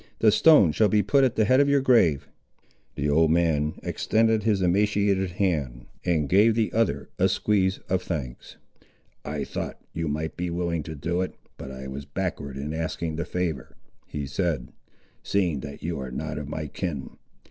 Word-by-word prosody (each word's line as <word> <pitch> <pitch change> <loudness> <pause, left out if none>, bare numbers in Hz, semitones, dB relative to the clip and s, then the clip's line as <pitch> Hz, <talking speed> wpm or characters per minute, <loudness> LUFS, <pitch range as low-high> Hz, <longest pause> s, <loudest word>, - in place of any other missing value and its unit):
The 110 - +5
stone 125 - +6
shall 105 +7 +3
be 105 -1 +3
put 140 -1 +3
at 125 -2 +2
the 110 - +3
head 130 +5 +4
of 140 0 +4
your 140 0 +4
grave." 85 - +3 0.7
The 70 - -1
old 80 +2 +4
man 80 -2 +1
extended 110 0 +1
his 105 -2 +1
emaciated 100 0 +2
hand, 75 -11 -1 0.2
and 80 -5 +1
gave 105 +6 +4
the 110 -2 0
other 115 0 0
a - - +4
squeeze 95 -3 +1
of 95 0 0
thanks. 70 -10 -6 0.7
"I - - -3
thought, - - -5
you 80 0 -2
might 75 +2 -3
be 90 0 -3
willing 85 -1 -1
to 80 - -5
do 85 +5 -1
it, 95 - -4 0.2
but - - -8
I 65 0 -8
was 70 +1 -7
backward 70 -1 -4
in 75 +3 -4
asking 80 0 -3
the 85 - -2
favour," 80 -8 -3 0.3
he 75 -1 -4
said, 75 -3 -2 0.5
"seeing 90 -8 0
that 70 +1 -9
you 85 -2 -3
are 65 -1 -5
not 75 +4 -4
of 75 -1 -7
my 80 0 -4
kin. 75 -4 -5
85 Hz, 180 wpm, -25 LUFS, 75-100 Hz, 0.7 s, stone